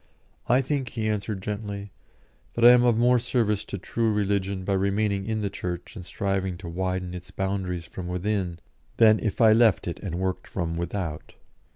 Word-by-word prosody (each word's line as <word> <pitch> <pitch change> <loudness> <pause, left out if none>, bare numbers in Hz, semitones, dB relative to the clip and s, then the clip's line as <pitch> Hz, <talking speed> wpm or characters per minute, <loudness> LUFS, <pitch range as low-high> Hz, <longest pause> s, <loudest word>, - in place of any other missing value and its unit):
"I 125 +3 +5
think," 135 -2 -2
he 110 -2 -3
answered, 105 -2 -2
gently, 100 -1 -5 0.6
"that 115 - +3
I 120 - +11
am 125 0 +6
of 120 -2 +3
more 125 +1 +4
service 115 -4 0
to 100 - -5
true 115 +4 -1
religion 100 -2 0
by 100 - 0
remaining 100 +1 0
in 110 -1 -1
the 100 - -1
Church 90 -2 -5
and 95 - -7
striving 95 0 -2
to 85 - -9
widen 90 +1 -2
its 90 0 -8
boundaries 95 -3 -3
from 90 0 -7
within, 90 -1 -2 0.4
than 110 -2 +6
if 110 -4 -2
I 110 -1 +7
left 110 -5 +4
it 85 - -4
and 90 -4 -4
worked 95 0 -2
from 85 -3 -3
without." 85 -2 -4
100 Hz, 185 wpm, -26 LUFS, 90-110 Hz, 0.6 s, I